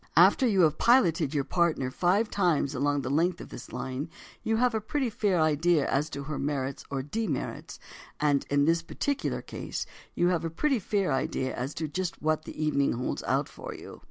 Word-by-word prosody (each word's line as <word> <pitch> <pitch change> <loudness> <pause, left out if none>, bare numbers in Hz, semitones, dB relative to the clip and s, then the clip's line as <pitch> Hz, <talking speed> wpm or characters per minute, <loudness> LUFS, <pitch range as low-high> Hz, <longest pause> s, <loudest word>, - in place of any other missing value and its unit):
After 260 - +6
you 200 -5 +3
have 155 -2 +3
piloted 170 - +4
your 140 - +2
partner 160 -6 +1
five 190 - +2
times 170 -8 +1
along 145 +1 +1
the 130 - -4
length 170 +4 +2
of - - -9
this 120 - -9
line 135 +5 -4 0.3
you 225 - 0
have 245 +1 +2
a 220 - 0
pretty 255 +3 -1
fair 200 -4 +1
idea 155 0 +3
as 145 +3 0
to 140 -2 -5
her 145 -1 -4
merits 135 -1 -2
or 135 -1 -2
demerits, 155 - -3 0.4
and, 145 -2 +2
in 145 0 +3
this 165 +1 +3
particular 280 +11 -2
case, - - -5 0.3
you 175 +1 +3
have 175 -2 0
a 165 - -1
pretty 265 - +1
fair 195 -3 0
idea 130 0 -1
as 130 +4 -4
to 160 - -2
just 180 +4 -3
what 155 0 0
the 155 - -4
evening 140 -2 +2
holds 125 +2 -3
out - - +1
for - - -8
you. - - -10
155 Hz, 200 wpm, -28 LUFS, 140-185 Hz, 0.4 s, After